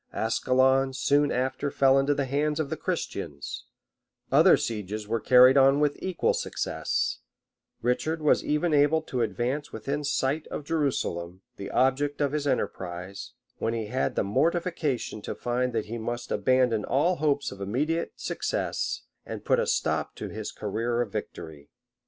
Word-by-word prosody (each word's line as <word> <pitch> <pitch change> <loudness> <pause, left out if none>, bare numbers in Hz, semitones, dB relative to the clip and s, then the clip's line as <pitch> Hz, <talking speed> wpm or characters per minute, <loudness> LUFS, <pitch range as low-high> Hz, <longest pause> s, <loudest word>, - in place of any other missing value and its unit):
[*] - - -36
Ascalon 130 +4 +2
soon 145 +2 +2
after 130 +3 -1
fell 135 -1 +4
into 140 +1 +2
the 140 - 0
hands 150 +3 0
of 150 -2 -2
the - - 0
Christians: 70 - -4 0.7
other - - +7
sieges 105 -1 -4
were 115 +1 0
carried 125 +4 +7
on 135 +1 +5
with 150 -1 0
equal 185 -2 0
success; - - -2 0.6
Richard 155 +7 0
was 150 -1 +3
even 150 +2 0
able 150 +2 +4
to 125 -5 -3
advance 120 +7 -2
within 145 +2 -3
sight 145 +1 0
of - - -5
Jerusalem, 95 - -2
the 100 0 -6
object 140 +3 +1
of 145 -2 +1
his 150 -1 -1
enterprise; 90 -6 -3 0.3
when 115 +1 -1
he 115 -1 -2
had 130 - 0
the - - +1
mortification 145 - -1
to - - -5
find 125 +1 -1
that 110 -2 -1
he 115 +2 -5
must 120 +2 -4
abandon 120 0 +2
all 170 +7 +1
hopes 145 -2 0
of 100 - -10
immediate 145 +12 -1
success, - - -2 0.2
and - - -7
must - - -32
put - - +3
a - - 0
stop - - 0
to - - -6
his 110 0 -5
career 115 +3 -2
of 115 -4 -3
victory. 75 -6 -7
130 Hz, 165 wpm, -27 LUFS, 115-145 Hz, 0.7 s, other